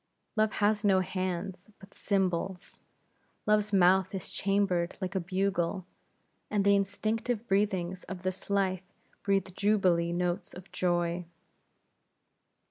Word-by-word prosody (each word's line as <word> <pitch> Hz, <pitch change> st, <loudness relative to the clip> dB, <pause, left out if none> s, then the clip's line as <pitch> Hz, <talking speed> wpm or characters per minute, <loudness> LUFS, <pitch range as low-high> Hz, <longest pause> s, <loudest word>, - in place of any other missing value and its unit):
Love 215 Hz, 0 st, +2 dB
has 210 Hz, 0 st, +1 dB
not 190 Hz, -2 st, +4 dB
hands, 185 Hz, +1 st, -4 dB
but 195 Hz, -1 st, -16 dB
cymbals; 190 Hz, -2 st, -1 dB, 0.6 s
Love's 210 Hz, 0 st, +2 dB
mouth 190 Hz, 0 st, +4 dB
is 185 Hz, -, -5 dB
chambered 195 Hz, -3 st, 0 dB
like 185 Hz, -1 st, -3 dB
a 190 Hz, -, +1 dB
bugle, 185 Hz, 0 st, -1 dB, 0.6 s
and 205 Hz, -2 st, +1 dB
the 200 Hz, 0 st, +6 dB
instinctive 215 Hz, +4 st, -1 dB
breathings 190 Hz, -2 st, 0 dB
of 190 Hz, -1 st, -7 dB
his 185 Hz, +1 st, -4 dB
life 190 Hz, -2 st, +1 dB, 0.4 s
breathe 195 Hz, -2 st, 0 dB
jubilee 185 Hz, -5 st, +2 dB
notes 175 Hz, 0 st, -2 dB
of 180 Hz, +1 st, -12 dB
joy! 175 Hz, -1 st, 0 dB
190 Hz, 120 wpm, -30 LUFS, 180-200 Hz, 0.6 s, the